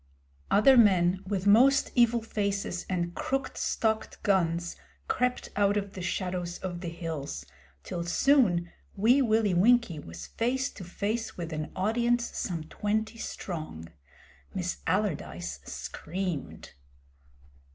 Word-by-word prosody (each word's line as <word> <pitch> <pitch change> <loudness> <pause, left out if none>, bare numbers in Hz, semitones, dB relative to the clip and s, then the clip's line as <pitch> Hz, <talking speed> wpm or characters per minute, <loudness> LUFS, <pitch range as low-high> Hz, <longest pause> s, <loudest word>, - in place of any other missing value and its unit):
Other 255 +6 +6
men 185 -4 +5
with 195 -1 -2
most 255 +7 +5
evil 235 -2 +3
faces 200 -4 -2
and 175 -2 -1
crooked 270 +7 -2
stocked 220 -1 -1
guns 175 -3 +1 0.3
crept 250 - 0
out 205 0 +3
of 200 -1 -3
the 185 - -6
shadows 180 -1 -2
of 180 -2 -5
the 175 - -4
hills, 165 -4 -5 0.4
till, 170 - -4
soon, 175 -5 +3 0.2
Wee 235 +7 +4
Willie 220 -5 +2
Winkie 200 -2 +4
was 85 - -9
face 255 +3 -1
to 195 - -10
face 210 +6 -3
with 170 -2 -5
an 155 0 -4
audience 235 +4 +1
some 170 -5 -3
twenty 215 +6 -2
strong. 155 - -6 0.7
Miss 180 -1 -2
Allardyce 165 - -1
screamed. 180 -3 -5
195 Hz, 120 wpm, -29 LUFS, 175-225 Hz, 0.7 s, Other